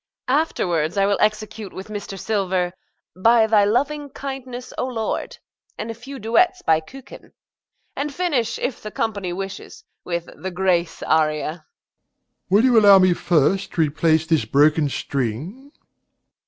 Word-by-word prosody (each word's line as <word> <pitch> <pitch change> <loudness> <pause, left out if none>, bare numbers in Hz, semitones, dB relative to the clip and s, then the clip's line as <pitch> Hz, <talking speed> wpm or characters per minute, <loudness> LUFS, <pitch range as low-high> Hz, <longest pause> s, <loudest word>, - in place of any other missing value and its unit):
Afterwards 175 - 0
I 195 - +4
will 200 0 +1
execute 215 -1 -1
with 190 +3 -8
Mr. 205 -2 -6
Silver, 185 -4 -1 0.4
"By 225 +4 +4
thy 215 -2 +4
loving 285 +7 0
kindness, 260 -2 -7
O - - -2
Lord," 225 -4 -3 0.4
and 230 - -4
a - - -5
few 260 +5 -10
duets 345 - +2
by 160 -1 +3
Kücken, 265 +11 -13 0.6
and 290 +1 -3
finish, 280 -8 -1
if 250 - -3
the 215 - -6
company 200 -4 -3
wishes, 195 +2 -7 0.2
with 170 -1 -3
the 190 - -7
"Grâce" 175 -2 0
aria. 155 -1 +2
DOMINIE. 160 +2 -5 0.9
Will 200 +4 +4
you 250 -3 +6
allow 200 -2 +8
me 185 -1 +4
first 175 +3 +1
to 165 - +1
replace 160 +1 +2
this 160 -1 +2
broken 150 +1 +3
string? 140 - -4
200 Hz, 145 wpm, -22 LUFS, 170-240 Hz, 0.9 s, allow